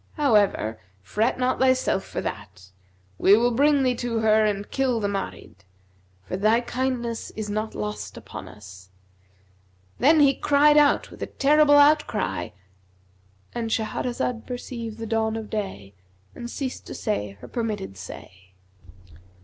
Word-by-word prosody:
However, 210 - +2 0.2
fret 215 - 0
not 255 0 0
thyself 260 -6 +2
for - - -5
that; 95 -2 -7 0.5
we 200 +2 +6
will 240 +2 +2
bring 285 +3 +3
thee 255 -1 +2
to 240 -1 -2
her 215 0 +4
and 205 -1 -2
kill 260 -4 +1
the 205 - -1
Marid; 195 - -5 0.7
for 140 - -5
thy 215 +4 +3
kindness 245 -2 -3
is 210 -1 -4
not 215 +1 -3
lost 105 0 -5
upon - - -9
us.' 95 -2 -13 1.1
Then 310 +4 +5
he 280 -2 +6
cried 295 +2 +4
out 295 -1 +4
with - - -13
a - - -2
terrible 290 +1 +4
outcry"—And 95 - -2
Shahrazad 225 +2 -2
perceived 235 -3 -6
the 225 - -5
dawn 220 0 0
of 220 -1 -6
day 190 - -5 0.4
and 240 - -7
ceased 260 +1 -5
to - - -7
say 105 - -3
her - - -11
permitted 215 - -4
say. 95 0 -12
220 Hz, 140 wpm, -24 LUFS, -, 1.1 s, we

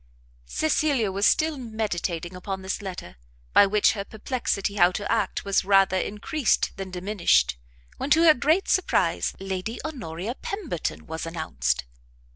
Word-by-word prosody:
Cecilia 285 -9 +1
was 200 +2 +2
still 310 -2 +2
meditating 190 -7 -3
upon 190 +1 -5
this 190 +2 -3
letter, 180 - -7 0.4
by 200 - +7
which 210 +1 +4
her 200 -3 -4
perplexity 215 -2 -2
how 180 -3 +4
to 205 +2 -3
act 220 -4 0
was 200 -1 +2
rather 195 -1 +4
encreased 210 +8 0
than 195 -1 -6
diminished, 180 - +2 0.4
when, 275 - -3
to 320 +3 +5
her 320 -2 +8
great 310 +8 +1
surprise, 375 - +1
Lady 195 +4 -4
Honoria 220 - -5
Pemberton 325 - -4
was 160 +1 -5
announced. 65 - -2
200 Hz, 140 wpm, -25 LUFS, 180-245 Hz, 0.4 s, her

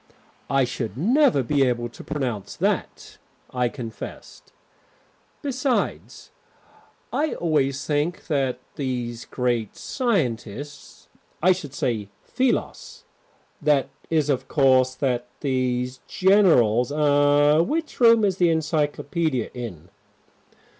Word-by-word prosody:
"I 135 -1 +3
should 120 -3 -4
never 240 - +3
be 140 +3 +2
able 120 -2 0
to 120 - -12
pronounce 130 - -4
that," - - -2 0.3
I 125 -1 0
confessed. 115 -2 -9 0.9
"Besides, 265 -2 -2 0.8
I 305 +1 0
always 140 -5 0
think 150 +3 -1
that 135 -5 0 0.2
these 125 -4 -3
great 120 -4 -2
scientists 145 - -3 0.4
I 185 - +6
should 160 -7 -3
say 110 -5 -2
philos 270 - -2 0.6
that 145 -3 +2 0.2
is, 155 -3 +2
of 130 - -2
course, 130 -2 +3
that 125 -3 -1
these 130 -2 -1
generals 160 - +4
er, 145 +1 +4
which 310 - -2
room 230 -3 +6
is 190 -2 0
the 175 -2 +3
Encyclopedia 155 -3 -1
in?" 100 -9 -8
140 Hz, 105 wpm, -24 LUFS, 125-170 Hz, 0.9 s, I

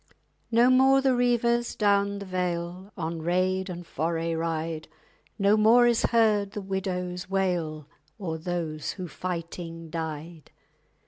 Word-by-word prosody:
_ - - -28 0.4
No 235 +2 +5
more 265 +1 +6
the 265 -1 +3
reivers 240 -1 +1
down 200 -1 +2
the 200 - -7
vale 180 +1 -3
On 165 -1 -3
raid 185 +3 0
and 175 -1 -6
foray 165 +1 -2
ride; 160 -1 -3 0.5
No 200 0 +4
more 225 +3 +6
is 235 -1 +3
heard 215 -3 +2
the - - -4
widow's 180 -2 -3
wail 175 -6 -1 0.3
_O'er 160 -5 -4
those 165 -4 -3
who 185 -2 -6
fighting 165 -1 -6
died. 160 0 -6
180 Hz, 135 wpm, -27 LUFS, 165-205 Hz, 0.5 s, more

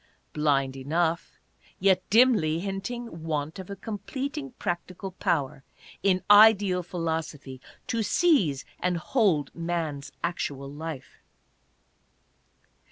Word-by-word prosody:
Blind 140 -3 +1
enough, 160 +5 -1 0.4
yet 190 -1 +4
dimly 210 -9 +4
hinting 195 +1 -5
want 155 +1 -3
of 190 - -8
a 200 - -5
completing 265 +8 -5
practical 185 0 -4
power 140 -7 -1 0.4
in 185 -2 +2
Ideal 205 -3 +7
Philosophy 160 -6 -4 0.2
to 230 -2 -1
seize 205 - +2
and 180 -1 0
hold 165 - +1
man's 165 -4 -3
actual 140 -5 -3
life. 155 -3 -7
175 Hz, 100 wpm, -27 LUFS, 150-200 Hz, 0.4 s, Ideal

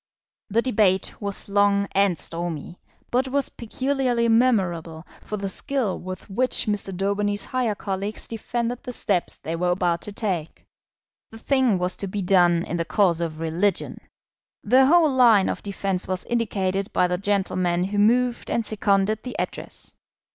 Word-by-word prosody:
The 230 +3 +2
debate 205 -7 +1
was 200 -1 -3
long 200 0 +2
and 195 -3 +2
stormy, 170 0 -5 0.3
but 255 +2 +1
was 275 +1 0
peculiarly 250 0 -1
memorable 180 -9 +1 0.2
for 210 - -5
the 200 -1 -3
skill 240 +1 -2
with 185 0 -8
which 250 +6 0
Mr. 205 -2 -2
Daubeny's 200 +2 -1
higher 245 -5 -1
colleagues 200 +1 -4
defended 235 +1 -3
the 250 -3 -7
steps 190 -6 0
they 165 - -5
were 180 +1 0
about 175 -1 +1
to 210 - -7
take. 190 -7 -4 0.6
The 225 - -11
thing 255 -3 +2
was 180 +1 0
to 200 - -4
be 195 +1 -3
done 175 -2 +4
in 170 - -3
the 170 - 0
cause 175 -2 +2
of 160 -2 -3
religion. 170 +5 -1 0.6
The 260 +1 +5
whole 325 -1 +5
line 230 -7 +5
of - - -3
defence 195 -2 -2
was 185 -1 -3
indicated 195 -4 -1
by - - +2
the 180 0 -1
gentlemen 185 -3 0
who 205 +2 -1
moved 240 +3 +2
and 230 - 0
seconded 210 0 +1
the 250 - -7
Address. - - -6
200 Hz, 160 wpm, -24 LUFS, 180-230 Hz, 0.6 s, The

